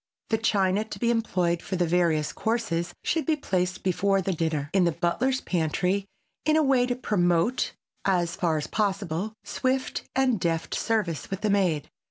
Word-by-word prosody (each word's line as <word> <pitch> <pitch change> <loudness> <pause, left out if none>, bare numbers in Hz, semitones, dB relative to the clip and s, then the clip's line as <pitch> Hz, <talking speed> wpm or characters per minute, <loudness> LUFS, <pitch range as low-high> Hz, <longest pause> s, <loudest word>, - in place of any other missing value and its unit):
The 220 - +2
china 200 -2 +2
to 220 - -8
be 235 0 +2
employed 180 -7 0
for 190 - -4
the 175 -1 +2
various 165 -3 +1
courses 180 -7 -1
should 325 0 0
be 315 - +3
placed, 180 -9 -1
before 195 +2 +2
the 190 0 -1
dinner, 155 -3 -1
in 190 -2 +4
the 170 - +3
butler's 215 +11 0
pantry 180 +3 0 0.4
in 310 +1 +3
a 315 - +4
way 260 -3 +3
to 245 - 0
promote, 180 -1 +1 0.3
as 175 -3 +1
far 165 -3 +1
as 150 - -2
possible, 200 -1 -1
swift 260 0 -1
and 260 -5 +2
deft 165 -1 -1
service 210 -9 -1
with 195 -1 -4
the 215 - +1
maid. 180 -8 +1
190 Hz, 175 wpm, -26 LUFS, 170-225 Hz, 0.4 s, in